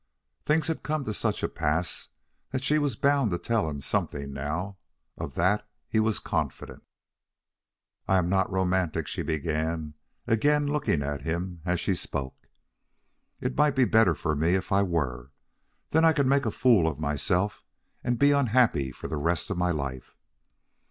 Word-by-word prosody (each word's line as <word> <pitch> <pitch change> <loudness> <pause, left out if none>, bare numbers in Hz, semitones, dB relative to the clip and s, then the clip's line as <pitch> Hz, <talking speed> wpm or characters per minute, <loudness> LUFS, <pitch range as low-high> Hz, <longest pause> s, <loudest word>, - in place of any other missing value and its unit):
Things 155 +1 +3
had 160 - -2
come 155 -1 -2
to 110 - -2
such - - -1
a - - +2
pass 80 +4 -2 0.4
that 130 0 -3
she 150 +3 +3
was 145 -6 0
bound 140 -2 +2
to 90 - -1
tell 105 0 0
him 70 -2 -5
something 70 +1 -2
now. 80 +8 -4 0.4
Of - - -6
that 105 +4 +1 0.2
he 110 - +1
was 110 -1 +2
confident. - - -3 1.3
"I 95 - +4
am 90 -2 +1
not 95 +1 +1
romantic," 90 -4 0
she - - -4
began, 80 0 -2 0.3
again 145 +6 +2
looking 145 - 0
at 70 0 -3
him 85 +3 -3
as 90 0 0
he 100 - +2
spoke. 70 -6 -5 0.9
"It 125 0 -2
might 150 -1 +3
be 130 -2 +4
better 110 -8 +4
for 75 +1 -1
me 80 +5 +2
if 95 - -3
I 100 +1 +4
were. 70 -10 -1 0.6
Then 160 +1 +4
I 165 -1 +6
could 140 -3 +2
make 140 +1 +2
a - - 0
fool 115 -10 +4
of 75 -3 -2
myself 80 +7 -1 0.4
and 120 -1 0
be 140 +3 +5
unhappy 120 - +3
for - - -8
the 80 - -3
rest 85 +7 -1
of 95 - -2
my 90 0 +2
life. 70 -6 -4
95 Hz, 170 wpm, -27 LUFS, 80-125 Hz, 1.3 s, I